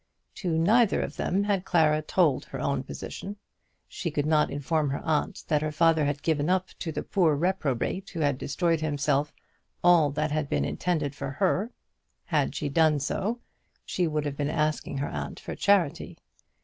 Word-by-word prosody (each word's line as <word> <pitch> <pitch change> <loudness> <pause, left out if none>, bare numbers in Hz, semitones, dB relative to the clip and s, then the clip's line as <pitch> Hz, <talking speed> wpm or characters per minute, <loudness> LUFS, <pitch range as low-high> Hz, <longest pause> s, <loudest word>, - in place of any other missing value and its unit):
To 170 -4 -1
neither 215 +7 +4
of - - -5
them 195 +3 0
had 200 -3 0
Clara 155 -4 +3
told 155 -3 +2
her - - -7
own - - 0
position. 200 +1 -7 0.5
She 170 - -4
could 145 -2 -1
not 155 -1 +3
inform 145 +1 0
her 140 - -3
aunt 160 +5 -1
that 150 -2 +2
her 155 0 -1
father 160 0 +3
had 145 0 -2
given 155 -1 +1
up 185 0 +1
to 165 - -3
the - - -4
poor 170 -7 +2
reprobate 180 +2 -1
who 165 - -5
had 145 -3 +1
destroyed 165 +2 0
himself 145 -1 0 0.5
all 175 -4 +6
that 150 +2 -1
had 150 -1 -1
been 70 -1 0
intended 155 - -1
for 140 -1 -5
her. 195 - 0 0.5
Had 150 -4 0
she 145 - -2
done 155 0 +3
so 215 - -2 0.4
she 180 -2 0
would 150 -1 -1
have 140 -1 -3
been 145 0 -1
asking 155 -2 -1
her 140 - -1
aunt - - -5
for - - -6
charity. 195 -7 +1
155 Hz, 180 wpm, -27 LUFS, 145-180 Hz, 0.5 s, all